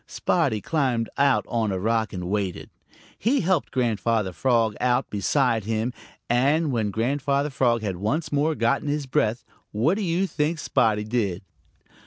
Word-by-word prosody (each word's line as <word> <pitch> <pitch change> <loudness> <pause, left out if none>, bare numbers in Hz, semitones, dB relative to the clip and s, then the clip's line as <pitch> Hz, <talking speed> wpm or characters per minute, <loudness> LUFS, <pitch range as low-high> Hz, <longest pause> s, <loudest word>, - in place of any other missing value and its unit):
Spotty 140 - 0
climbed 130 -7 0
out 140 -1 +3
on 115 -3 0
a 95 - -1
rock 110 +3 0
and 90 -3 -5
waited. 100 -2 -3 0.5
He 270 +5 +2
helped 180 -2 +1
Grandfather 115 -5 0
Frog 115 +2 +1
out 125 +1 +2
beside 115 +2 +1
him, 110 +2 -1 0.3
and 140 +6 +2
when 110 -4 0
Grandfather 140 +6 0
Frog 120 -4 +1
had 95 -4 -2
once 150 - -2
more 150 +2 +1
gotten 135 +5 0
his 145 0 -1
breath, 120 -2 0 0.3
what 120 - +2
do 210 - -2
you 180 0 +1
think 160 -1 -1
Spotty 110 -7 +1
did? 105 -5 -2
120 Hz, 155 wpm, -24 LUFS, 110-145 Hz, 0.5 s, out